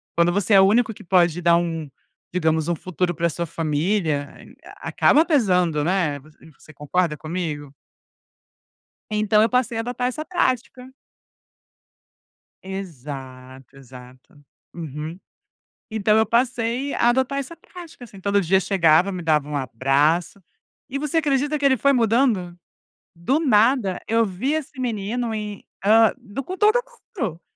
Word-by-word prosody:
quando 170 +1 +3
você 200 +2 0
é 195 - +8
o - - +6
único 225 +2 +2
que - - -14
pode 175 -2 +2
dar 170 0 +4
um, 165 -3 -3 0.4
digamos, 160 -2 +1
um 175 - +1
futuro 175 +2 -2
pra 170 +1 0
sua 170 +2 -3
família, 155 -1 -1 0.5
acaba 310 +3 +3
pesando, 180 - +2
né, 165 -4 0
você 155 +1 -18
concorda 150 +2 -1
comigo? 155 -4 -5 1.4
Então 210 0 +2
eu 225 - +3
passei 245 -2 0
a - - 0
adotar 245 +1 -2
essa 305 +5 -5
prática. 255 -7 -2 1.8
Exato, 135 -8 -9
exato. 130 +4 -15 0.3
Uhum. 155 +1 -6 0.7
Então 215 -1 +2
eu 220 0 +3
passei 240 +3 0
a 235 - +2
adotar 265 +2 0
essa 280 +5 -6
prática, 345 -8 -12
assim, 200 -5 -14
todo 200 +1 +1
dia 190 +1 +2
chegava, 180 -1 +3
me 180 - -5
dava 150 -3 +1
um 150 - -3
abraço 140 - 0 0.5
e 275 0 -3
você 300 +2 -1
acredita 290 0 0
que 285 - -4
ele 265 -1 +4
foi 280 +5 +3
mudando, 225 -7 +1 0.6
do 215 - 0
nada, 230 - +2
eu 225 0 +2
vi 215 +9 -2
esse 300 -3 -4
menino 230 0 -2
em, 210 -2 -6 0.2
hã, 220 +1 +5
do 210 +7 -7
todo 430 +4 +4 0.4
mundo, 175 - -3
190 Hz, 140 wpm, -22 LUFS, 160-240 Hz, 1.8 s, é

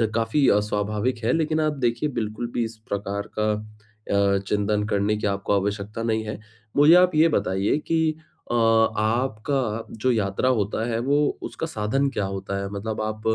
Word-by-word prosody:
काफ़ी 115 +5 +2
अ, 105 - +5
स्वाभाविक 105 +4 -1
है, 115 - +2
लेकिन 160 -1 +1
आप 155 -1 +1
देखिए 120 +5 0
बिल्कुल 110 -1 -3
भी 120 - 0
इस 115 0 -6
प्रकार 100 0 -3
का 110 0 +2 0.6
अ, 100 0 +3
चिंतन 105 +1 +1
करने 105 0 +1
की 105 - -1
आपको 100 0 -1
आवश्यकता 100 +3 -3
नहीं 110 -1 0
है। 105 -1 -5 0.4
मुझे 145 +3 +7
आप 180 -2 +5
ये 160 +2 +6
बताइए 100 -3 +1
कि 160 -1 +1 0.4
अ - - 0
आपका 115 +1 +1
जो 130 +4 +2
यात्रा 105 +2 0
होता 105 +2 -1
है, 115 -1 -1
वो 145 +4 +1
उसका - - -4
साधन 135 +2 0
क्या 105 - -2
होता 95 0 -4
है? 100 - -4
मतलब 105 +2 -4
आप 110 0 -3
110 Hz, 175 wpm, -24 LUFS, 105-130 Hz, 0.6 s, मुझे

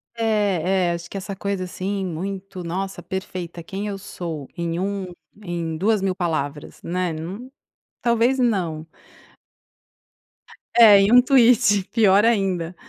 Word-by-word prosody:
É, 195 -5 +1
é - - +1
acho 170 0 -5
que - - -6
essa 195 +1 -6
coisa, 200 -1 -3
assim, 190 +2 -3
muito 185 +2 -5
nossa 190 +3 -4
perfeita 180 -2 -6
quem 195 +5 -5
eu 200 -1 -4
sou 165 -7 -7
em 170 0 -2
um 195 0 -2 0.4
em 170 -3 -4
2000 195 0 +1
palavras, 155 -5 -3
né, 180 0 -2
nu 190 +11 -7 0.5
talvez 235 +2 +2
não. 180 -10 0 1.9
É 215 -4 +8
e 200 +2 +2
um 250 +1 +8
tweet 240 -6 +4
pior 205 -3 +4
ainda. 190 -6 0
190 Hz, 130 wpm, -22 LUFS, 170-205 Hz, 1.9 s, É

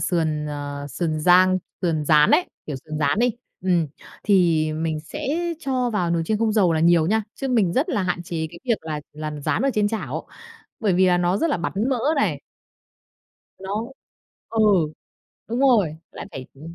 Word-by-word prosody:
sườn, 155 -4 0
ờ, 145 -1 -5
sườn 155 +2 -2
rang, 185 +3 +5 0.2
sườn 160 -4 0
rán 150 0 +5
ấy, 350 +5 +4 0.2
kiểu, 145 -3 -4
sườn 155 -1 -5
rán 145 +5 +1
đi, 245 +1 +3 0.3
ừm, 175 -3 +2 0.4
thì 170 -6 +3
mình 155 0 -2
sẽ 155 - -7 0.3
cho 255 -4 0
vào 180 -6 0
nồi 170 -1 +1
chiên 215 - 0
không 225 -1 +1
dầu 195 -6 +3
là 160 - +1
nhiều 170 -1 +4
nha, 220 +4 +2
chứ 270 - -4
mình 220 -9 +2
rất 280 - +1
là 210 - 0
hạn 180 -1 -1
chế 165 -2 -3
cái 170 - -11
việc 235 -4 +1
là 155 -2 -3
làm 150 0 -5
rán - - 0
ở 275 - +2
trên 210 -2 +2
chảo, 225 0 -4 0.5
bởi 210 -5 +2
vì 185 +1 +4
là 180 -1 +3
nó 175 +1 +1
rất 330 +9 +1
là - - +1
bắn 175 - -3 0.2
mỡ 260 - +1 0.2
này. 280 - 0 1.2
Nó 210 +7 -4 0.6
ừ, 225 -1 0 0.9
đúng 235 +3 -2
rồi, 215 - +3 0.2
lại - - -8
phải, 130 -1 -7
ừm, 160 +5 -10
175 Hz, 195 wpm, -23 LUFS, 155-220 Hz, 1.2 s, rang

